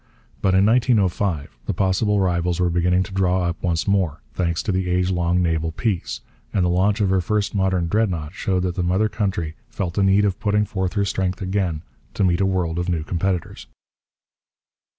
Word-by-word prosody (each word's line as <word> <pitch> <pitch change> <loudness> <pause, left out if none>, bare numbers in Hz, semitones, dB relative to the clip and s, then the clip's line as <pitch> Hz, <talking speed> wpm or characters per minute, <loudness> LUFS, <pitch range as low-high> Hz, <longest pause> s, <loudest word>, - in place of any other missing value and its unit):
But 95 -1 +2
in 95 +1 +5
1905 100 - +1
the - - -1
possible 100 +2 +1
rivals 90 -2 0
were 90 -1 +2
beginning 90 +2 +2
to 100 - -10
draw 95 -1 +1
up 85 0 -2
once 85 -3 -1
more, 95 -6 +1
thanks 85 -2 -1
to 105 - -1
the 95 -1 -1
age 90 +1 +1
long 90 0 +1
naval 80 -1 0
peace; 85 - -2 0.3
and 95 -3 +1
the - - +2
launch 100 +4 +2
of 95 -2 +2
her 95 -1 +3
first 105 +3 -1
modern 95 -3 +1
Dreadnought 90 -6 -1
showed 95 -3 -1
that 90 -1 -1
the 90 - -2
mother 95 +5 +2
country 95 -7 -2 0.2
felt 90 -3 -3
the 100 - 0
need 100 +1 +4
of 95 -3 -1
putting 105 -1 +1
forth 95 -3 -2
her 100 -2 +1
strength 95 -1 -1
again 95 -5 -1 0.3
to - - +1
meet 90 0 +2
a 95 - +3
world 90 -3 -1
of 90 +1 -2
new 85 -3 0
competitors. 90 +1 -2
95 Hz, 195 wpm, -22 LUFS, 85-100 Hz, 0.3 s, in